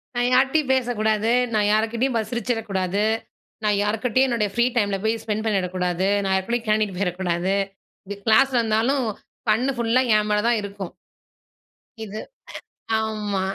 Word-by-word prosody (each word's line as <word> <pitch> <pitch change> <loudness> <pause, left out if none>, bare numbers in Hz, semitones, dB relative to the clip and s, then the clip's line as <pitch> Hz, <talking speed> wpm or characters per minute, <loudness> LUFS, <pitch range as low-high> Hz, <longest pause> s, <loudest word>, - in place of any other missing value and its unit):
நான் 245 0 +1
யார்ட்டயும் 270 +2 +3
பேசக்கூடாது. 225 -3 +1 0.2
நான் 210 -1 +2
யார்க்கிட்டயும் 230 +4 0
பாத்து 220 -1 -1
சிரிச்சுறக்கூடாது. 210 -5 -1 0.6
நான் 210 -1 +2
யார்க்கிட்டயும் 225 +5 +1
என்னுடைய 225 -4 0
ஃப்ரீ 235 0 +3
டைமுல 200 -3 +1
போய் 220 +1 0
ஸ்பெண்ட் 215 0 -2
பண்ணிடக்கூடாது. 185 -3 0 0.2
நான் 195 -1 0
யாரு 190 0 0
கூடேயும் 240 0 -1
கேன்டீனுக்கு 215 -3 +1
போயிறக்கூடாது. 180 -1 -1 0.5
இது 205 - -5
கிளாஸ்ல 250 +3 +4
இருந்தாலும், 230 +4 +1 0.5
கண்ணு 250 +6 +1
ஃபுல்லா 235 +2 +2
என் 210 0 0
மேல 210 0 +2
தான் 235 -2 +3
இருக்கும். 200 -2 -7 1.1
இது. 215 0 -6 0.8
அ - - +3
ஆமா. 210 -3 -2
220 Hz, 140 wpm, -23 LUFS, 200-235 Hz, 1.1 s, கிளாஸ்ல